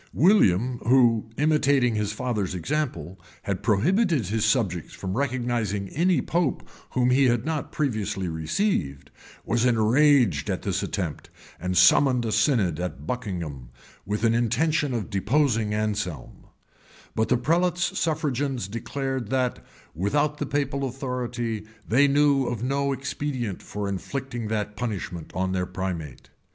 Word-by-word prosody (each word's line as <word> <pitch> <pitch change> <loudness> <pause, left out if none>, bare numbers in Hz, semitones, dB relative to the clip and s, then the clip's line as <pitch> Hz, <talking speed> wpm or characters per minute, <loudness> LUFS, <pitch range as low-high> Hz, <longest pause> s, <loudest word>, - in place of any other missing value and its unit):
[] - - -32
William, 125 - +4
who, 115 -3 +3
imitating 140 -4 +3
his 105 -1 -1
father's 105 -5 -2
example, 95 - -3 0.2
had 100 -2 -2
prohibited 155 - +2
his 105 +3 -1
subjects 95 - 0
from 95 0 -4
recognizing 120 -7 -1
any 175 +3 +2
pope 170 -4 -1 0.3
whom 125 0 +2
he 135 +2 +4
had 120 -2 +2
not 155 -2 -3
previously 110 -9 -2
received, 80 - -1 0.3
was 120 +1 +1
enraged 120 - +3
at - - -2
this - - -1
attempt, - - -4 0.3
and 90 +1 -2
summoned 125 - +5
a 110 - -1
synod 110 - +2
at 90 -5 -5
Buckingham, 85 - -4 0.3
with 105 +3 -3
an 115 -1 +4
intention 135 +6 +1
of 110 -1 -4
deposing 110 +2 +1
Anselm; 105 - -3 0.7
but 110 - 0
the 125 - +4
prelate's 175 +7 +1
suffragans 145 - -1
declared, 130 +2 -4
that, 130 -1 -1 0.3
without 145 - 0
the - - -2
papal 140 -1 -1
authority, 120 -4 -3 0.2
they 135 +5 +4
knew 140 -2 +3
of 120 -2 -3
no 140 +2 0
expedient 130 -5 -3
for 105 -1 -5
inflicting 120 +4 -4
that 105 -1 -2
punishment 100 -8 -4
on 95 0 0
their 90 -1 -1
primate. 85 -8 -5
120 Hz, 135 wpm, -25 LUFS, 100-140 Hz, 0.7 s, summoned